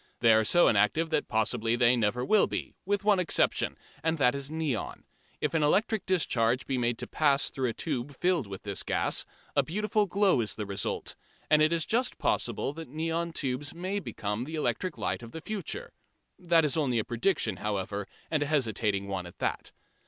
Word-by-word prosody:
They 115 -2 +6
are 110 0 +4
so 175 +11 +5
inactive 115 +11 +2
that 150 - +1
possibly 115 0 +1
they 120 0 +4
never 120 +2 0
will 215 +7 +4
be, - - -4
with 205 0 0
one 205 -2 +4
exception, 180 - +1 0.3
and 160 0 +1
that 125 -4 +4
is 140 0 -4
neon. 155 -7 -3 0.4
If - - -1
an 165 - +2
electric 195 +6 +1
discharge 125 -9 +1
be 130 -2 -1
made 120 -1 0
to - - -4
pass 145 -3 +2
through 130 -2 -1
a - - -3
tube 140 0 -3
filled 175 - +1
with 95 -1 -8
this 100 -3 -2
gas, - - +1 0.3
a 140 - +5
beautiful 210 - 0
glow 195 -7 +3
is 110 - -1
the 105 - -4
result, 100 -1 -3 0.4
and 155 0 +6
it 155 +1 +4
is 165 -2 +1
just 245 +7 0
possible 135 - 0
that 165 +1 -8
neon 165 +3 -2
tubes 145 0 -3
may 185 +4 -2
become 105 - -4
the 160 +3 -6
electric 170 +3 -1
light 95 +3 -2
of 115 -1 -11
the 160 - -6
future. 200 -3 -5 0.5
That 170 -3 +3
is 145 - +1
only 140 -7 +1
a 110 - +1
prediction, 120 - 0
however, 100 0 -3 0.2
and 155 -2 +1
a 145 - 0
hesitating 110 -8 0
one 95 -3 -3
at 85 - -14
that. - - -2
140 Hz, 195 wpm, -29 LUFS, 115-165 Hz, 0.5 s, They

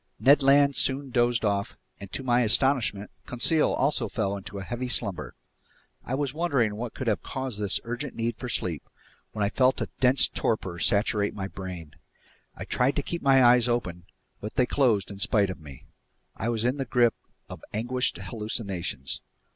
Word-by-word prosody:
Ned 140 +3 +5
Land 140 +1 +4
soon 135 0 +1
dozed 120 -1 +2
off, 100 -1 -1 0.2
and 100 -1 -10
to 135 - -4
my 125 -1 +3
astonishment, 115 -3 +2 0.2
Conseil 150 +6 +2
also 140 +3 0
fell 100 -4 -2
into 100 0 -7
a 95 - -5
heavy 120 +4 -4
slumber. 105 -6 -2 0.7
I 130 - -3
was 140 -1 -2
wondering 140 -10 0
what 115 +1 -6
could 130 - -5
have 110 -3 0
caused 130 -5 -4
this 105 -2 +2
urgent 120 +4 -4
need 115 0 -2
for 125 +3 -7
sleep, 85 -8 -2 0.5
when 105 -2 0
I - - +1
felt 130 0 +2
a - - -3
dense 130 +1 +5
torpor 95 -6 -2
saturate 100 0 +2
my 95 -2 -4
brain. 90 -6 -8 0.6
I - - -7
tried 125 +3 +1
to 145 - -1
keep 170 +3 -4
my 135 -1 +5
eyes 120 0 +5
open, 90 -8 -2 0.3
but 105 - -7
they 125 - +3
closed 115 -8 +1
in 100 - -9
spite 105 -2 +2
of 95 - -9
me. 70 -4 -12 0.5
I 115 - -3
was 115 -1 -1
in 125 +3 +1
the 135 - -2
grip 120 -2 +3 0.3
of - - -10
anguished 125 +4 -1
hallucinations. 100 - -4
120 Hz, 180 wpm, -26 LUFS, 100-130 Hz, 0.7 s, Ned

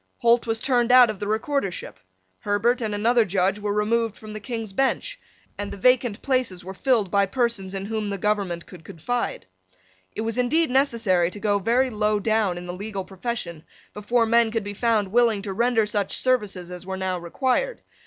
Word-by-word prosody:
Holt 235 0 +3
was 225 0 0
turned 245 -2 +2
out 250 -3 +7
of 205 - -10
the 205 - -4
recordership. 215 - -2 0.4
Herbert 225 +5 +1
and 215 -2 -2
another 230 +3 +3
Judge 195 0 0
were 205 0 -2
removed 215 +1 0
from 215 -1 -10
the 215 - -5
King's 220 -1 -5
Bench; - - -1 0.4
and 205 0 -4
the - - -7
vacant 245 0 +2
places 255 -10 -1
were 190 - -6
filled 225 -3 +1
by 200 -1 +3
persons 215 -4 -1
in 195 0 -3
whom 215 -1 -3
the 200 - -3
government 195 -4 -1
could 175 -3 -13
confide. 240 +11 -3 0.7
It - - -3
was 225 +2 -2
indeed 285 +4 +2
necessary 230 -10 +2
to 205 - -9
go 205 -1 +1
very 245 +6 +1
low 210 -1 +1
down 215 -4 +1
in 175 - -7
the 175 - -5
legal 195 0 -5
profession 185 -4 -5 0.3
before 230 +3 +1
men 230 0 +3
could 225 -1 -2
be 205 0 -5
found 215 -2 +1
willing 230 -3 +3
to 200 -2 -4
render 235 +1 +2
such 205 -2 -1
services 205 -8 0
as 180 -1 -7
were 190 0 -5
now 185 -1 -2
required. 260 - -1
215 Hz, 195 wpm, -24 LUFS, 195-240 Hz, 0.7 s, out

